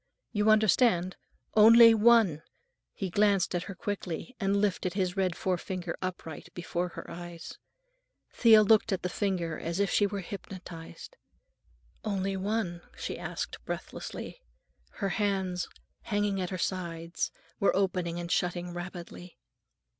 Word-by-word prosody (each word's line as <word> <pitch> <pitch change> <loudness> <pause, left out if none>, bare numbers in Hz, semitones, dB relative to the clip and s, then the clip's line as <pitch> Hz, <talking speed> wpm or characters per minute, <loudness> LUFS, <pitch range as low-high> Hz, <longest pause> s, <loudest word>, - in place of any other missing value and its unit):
You 210 -2 +2
understand? 215 -3 +4 0.4
Only 230 +2 +9
one!" 220 -8 +5 0.5
He 190 -3 -4
glanced 200 -2 +3
at 175 0 -1
her 195 - -6
quickly 200 +3 -4
and 200 -1 +1
lifted 190 -3 0
his 185 -3 0
red 185 -3 0
forefinger 180 -1 -2
upright 180 -4 -6
before 175 0 -2
her - - -9
eyes. 175 -1 -9 0.7
Thea 220 -3 +7
looked 220 +1 +4
at 190 - -1
the 180 - -1
finger 180 -5 -1
as 170 +3 -3
if 200 -2 +1
she 205 - +3
were 200 -1 -4
hypnotized. 180 -3 -9 0.9
"Only 195 -2 -1
one?" 190 -3 -2 0.2
she - - -4
asked - - -5
breathlessly; - - -6 0.5
her 200 -3 -2
hands, 190 -3 -1 0.3
hanging 205 -2 0
at 180 - -2
her 185 - -3
sides, 170 -2 -3 0.3
were 200 - +3
opening 180 -3 0
and 170 0 -5
shutting 175 0 -1
rapidly. 175 0 -8
185 Hz, 130 wpm, -29 LUFS, 175-205 Hz, 0.9 s, Only